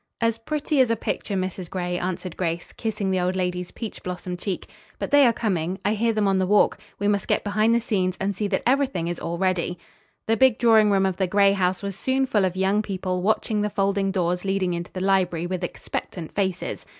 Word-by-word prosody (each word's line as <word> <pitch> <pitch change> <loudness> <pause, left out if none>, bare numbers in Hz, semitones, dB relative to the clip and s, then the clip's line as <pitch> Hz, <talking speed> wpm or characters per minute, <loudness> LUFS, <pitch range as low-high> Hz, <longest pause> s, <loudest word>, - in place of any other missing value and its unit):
"As 230 -1 +1
pretty 295 +3 0
as 250 - +3
a 230 - +2
picture, 210 -2 -3
Mrs. 185 -1 -3
Gray," 180 -1 -2
answered 180 -1 -4
Grace, 170 -1 -3
kissing 210 -3 -2
the 185 - +1
old 180 +1 0
lady's 180 -1 -2
peach 225 -3 -7
blossom 180 0 -5
cheek. 185 +1 -4 0.3
"But - - -4
they 285 -2 +7
are - - +5
coming. 190 -6 -1
I 205 - +3
hear 230 +2 +1
them 215 -2 +1
on 195 -1 +2
the 185 - +1
walk. 205 +1 +3 0.2
We 205 - -1
must 205 -1 +1
get - - +1
behind 215 +3 +2
the - - +4
scenes 190 -5 -1
and 195 +1 -1
see 205 +2 -1
that 195 -1 -1
everything 260 -10 +1
is 175 - -4
all 170 +1 -3
ready." 180 -1 0 0.5
The 225 0 +2
big 255 -1 +5
drawing 220 -3 +5
room 195 -1 +3
of 190 -2 -1
the 190 - +1
Gray 200 +1 +4
house 185 -1 0
was 200 -1 -3
soon 265 +6 +1
full 215 -7 +2
of 185 -1 -1
young 190 +2 +2
people 185 -3 -3
watching 215 +1 +1
the 210 - 0
folding 195 0 0
doors 180 -2 0
leading 195 -2 0
into 170 0 -5
the 185 - -5
library 185 -3 +1
with 185 0 -3
expectant 175 -1 -5
faces. 190 -2 -2
195 Hz, 225 wpm, -24 LUFS, 180-215 Hz, 0.5 s, they